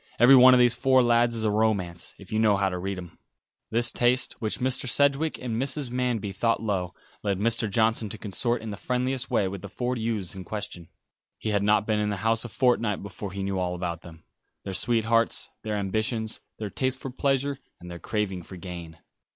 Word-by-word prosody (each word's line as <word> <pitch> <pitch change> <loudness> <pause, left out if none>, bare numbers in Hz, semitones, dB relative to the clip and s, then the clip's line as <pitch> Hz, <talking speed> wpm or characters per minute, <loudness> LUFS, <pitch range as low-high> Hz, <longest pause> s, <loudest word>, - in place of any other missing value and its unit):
Every 125 +4 +8
one 130 0 +9
of - - +4
those 120 -1 +6
four 130 +2 +3
lads 120 0 +3
is 110 - -3
a 110 - +2
romance, 100 -6 0
if 100 +1 -11
you 110 - +1
know 105 -3 +4
how 100 -1 +1
to 90 -1 -4
read 95 +1 -3
him." 90 -3 -10 0.5
This 120 +1 +2
taste, 125 +2 +2
which 110 -1 -1
Mr. 130 0 -1
Sedgewick 140 +4 +2
and 115 -1 -3
Mrs. 135 -1 0
Manby 120 -5 -1
thought 115 +4 +1
low, 95 -5 -2 0.3
led 100 -2 -1
Mr. 115 +1 +1
Johnson 110 +1 +1
to - - -7
consort 115 +4 -1
in 110 - -5
the 100 - -6
friendliest 125 +3 -2
way 100 - +2
with 95 0 -6
the - - -8
four 125 0 -2
youths 110 -6 -2
in 95 -1 -7
question. 90 -4 -6 0.5
He 110 - -4
had 100 -1 +1
not 105 0 +3
been 110 -1 +1
in 105 0 0
the 100 - -2
house 115 0 +2
a 120 - -6
fortnight 115 -4 +1
before 100 0 -7
he 100 +1 -4
knew 95 -1 -1
all 90 -1 -1
about 85 -2 -4
them; 80 -2 -13 0.4
their 95 - -5
sweethearts; 115 +2 +1
their 105 -1 -2
ambitions; 110 +3 -1 0.2
their 105 -2 -5
tastes 130 0 -1
for 135 - -6
pleasure, 135 +1 0 0.2
and 90 0 -10
their 85 - -7
craving 95 0 -2
for 90 +2 -11
gain. 85 -3 -8
110 Hz, 215 wpm, -26 LUFS, 95-120 Hz, 0.5 s, one